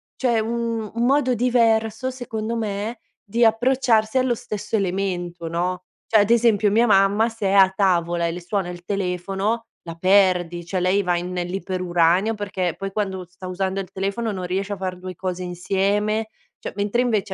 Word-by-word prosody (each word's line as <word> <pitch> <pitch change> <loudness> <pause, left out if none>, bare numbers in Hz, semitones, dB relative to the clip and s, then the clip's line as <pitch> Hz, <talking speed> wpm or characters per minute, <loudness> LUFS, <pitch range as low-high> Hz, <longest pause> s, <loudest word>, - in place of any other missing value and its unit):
cioè 240 -3 +1
un 230 -1 -2
un 230 +1 0
modo 260 -1 +3
diverso 230 0 +2
secondo 230 -3 -4
me 220 +1 -3 0.2
di 230 +3 0
approcciarsi 230 0 +3
allo 255 -2 +1
stesso 210 0 -4
elemento, 180 -3 -2
no? 180 +2 -2 0.2
Cioè 220 -2 +4
ad 205 - 0
esempio 225 -3 +4
mia 225 +4 +4
mamma 205 +2 +4
se 225 -3 -3
è - - +1
a 190 -1 +6
tavola 175 -3 +1
e - - -1
le 175 +2 -6
suona 185 +1 -2
il 175 0 -8
telefono 195 +3 -2 0.2
la 165 -1 -8
perdi, 180 -2 +3
cioè 185 +2 -2
lei 185 +3 +2
va 180 -2 0
in 175 +1 -4
nell'iperuranio 180 +1 +1
perché 190 -4 -2
poi 195 0 -4
quando 190 -3 -3
sta 180 +1 -11
usando 190 +1 -2
il 195 - -5
telefono 200 +4 -2
non 185 -3 -4
riesce 195 +3 -2
a - - -5
far 185 -1 -4
2 185 0 -7
cose 185 +1 -4
insieme. 200 +4 0 0.3
Cioè - - -6
mentre 205 +4 0
invece 210 -5 0
195 Hz, 175 wpm, -22 LUFS, 180-225 Hz, 0.3 s, a